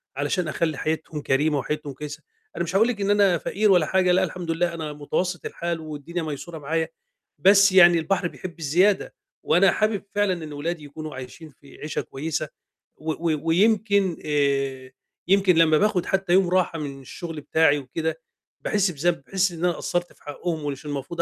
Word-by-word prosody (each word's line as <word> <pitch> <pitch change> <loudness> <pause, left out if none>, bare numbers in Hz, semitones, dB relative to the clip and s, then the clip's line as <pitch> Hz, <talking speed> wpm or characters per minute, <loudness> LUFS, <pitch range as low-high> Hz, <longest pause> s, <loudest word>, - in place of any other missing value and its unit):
علشان 145 +6 -1
أخلّي 155 -1 -1
حياتهم 155 0 -3
كريمة 145 +2 +1
وحياتهم 150 +1 -4
كويسة، 150 +3 -8 0.3
أنا 170 - -1
مش 170 +3 -5
هاقول 220 +4 +5
لِك 220 -5 -3
إن 200 - 0
أنا 200 -4 +4
فقير 205 +5 +1
ولا 175 -4 +5
حاجة، 185 +2 +2
لأ 185 +1 +3
الحمد 175 -2 -3
لله 170 +1 0
أنا 155 -2 -5
متوسط 175 +5 -3
الحال 170 -1 -3
والدنيا 155 +3 -5
ميسورة 155 +2 -6
معايا، 160 +3 -1 0.5
بس 200 +4 +6
يعني 175 -2 +7
البحر 175 +3 0
بيحب 175 0 -9
الزيادة، 180 +7 +2 0.3
وأنا 180 +3 +4
حابب 215 -2 0
فعلًا 190 -5 +1
إن 150 - -8
ولادي 160 +2 -4
يكونوا 155 +1 -8
عايشين 130 +5 -9
في 140 0 -18
عيشة 150 - -3
كويسة، 155 +2 -4 0.5
و 160 +1 -3
و 160 -2 -1
ويمكن 200 0 +3
آآ، 140 -3 0 0.4
يمكن 195 -1 +4
لمّا 160 -1 +5
باخد 195 -1 +1
حتى 195 -2 0
يوم 185 -1 +4
راحة 180 -2 +1
من 140 -2 -6
الشُغل 165 +3 -7
بتاعي 150 -1 +3
وكده، 160 +4 -4 0.4
باحس 200 -3 +1
بذنب، 165 -1 -1
باحس 190 +4 0
إن 170 - -9
أنا 180 - +3
قصَّرت 175 +1 -3
في - - -26
حقُهُم 155 +1 -4
ومش 140 0 -5
المفروض 145 +4 -3
165 Hz, 180 wpm, -24 LUFS, 150-185 Hz, 0.5 s, يعني